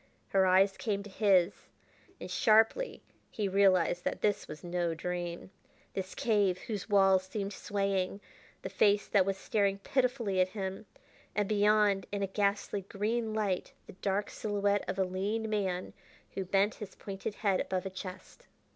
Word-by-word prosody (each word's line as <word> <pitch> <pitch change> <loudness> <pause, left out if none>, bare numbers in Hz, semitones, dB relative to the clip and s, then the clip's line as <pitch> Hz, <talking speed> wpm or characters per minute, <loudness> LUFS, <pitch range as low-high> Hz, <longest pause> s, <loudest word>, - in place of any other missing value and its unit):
Her 190 -1 +3
eyes 190 +1 +4
came 200 -3 -2
to 205 - -11
his, 190 -3 +3 0.7
and - - -7
sharply 225 - +3 0.3
he 210 -2 -2
realized 185 -3 +3
that - - -2
this 205 -1 0
was 150 - -9
no 175 -1 -1
dream 175 +1 -4 0.4
this 190 -1 -5
cave 205 -5 +2
whose 210 +1 -5
walls 195 -2 +5
seemed 200 +1 -4
swaying, 195 -1 -1 0.4
the - - -4
face 205 0 +3
that 195 -2 +3
was 195 -1 0
staring 200 0 0
pitifully 240 -4 0
at 185 - +2
him, 195 +1 -4 0.5
and, 205 -1 +1
beyond, 210 -1 +3
in 200 -1 -2
a - - 0
ghastly 200 +1 0
green 215 +3 -2
light, 200 -4 -1
the - - -12
dark 195 +2 -2
silhouette 205 -1 0
of - - -2
a 190 - +3
lean 200 +5 -2
man 190 -4 -2 0.4
who 190 - -4
bent 195 +3 +2
his 200 -2 -7
pointed 195 +1 -6
head 200 -3 +1
above 185 -1 -2
a 190 - -4
chest. 185 - -9
195 Hz, 160 wpm, -31 LUFS, 190-210 Hz, 0.7 s, walls